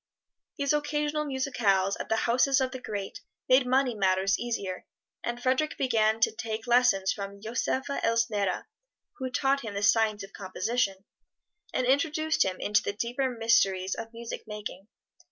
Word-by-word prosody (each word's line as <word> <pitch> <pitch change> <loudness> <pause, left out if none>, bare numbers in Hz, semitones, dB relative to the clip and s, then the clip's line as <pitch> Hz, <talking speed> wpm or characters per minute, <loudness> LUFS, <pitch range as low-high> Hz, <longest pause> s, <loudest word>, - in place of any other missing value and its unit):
These 280 0 +1
occasional 295 0 0
musicales 230 -9 +1
at - - -5
the 220 - +3
houses 255 +3 +3
of 260 -1 0
the 260 -1 -7
great 200 -4 -5 0.3
made 255 0 +5
money 260 0 +2
matters 195 -1 +2
easier, 200 -6 -4 0.4
and 240 0 -3
Frederic 260 +5 0
began 225 -4 +2
to - - +4
take 220 0 -4
lessons 240 -6 +3
from 200 -1 -7
Joseph 235 +5 -2
Elsner, 230 -7 0 0.5
who 260 -1 -2
taught 275 +2 +1
him 215 -3 -6
the 200 - -2
science 215 -1 +3
of 195 - -11
composition, 195 +1 -2 0.7
and 255 - 0
introduced 310 +4 +2
him 185 -1 -3
into 210 +1 +2
the 200 - -3
deeper 240 +5 -1
mysteries 195 -6 +2
of 225 0 -6
music 235 0 -7
making. 210 -2 -7
230 Hz, 155 wpm, -28 LUFS, 200-260 Hz, 0.7 s, made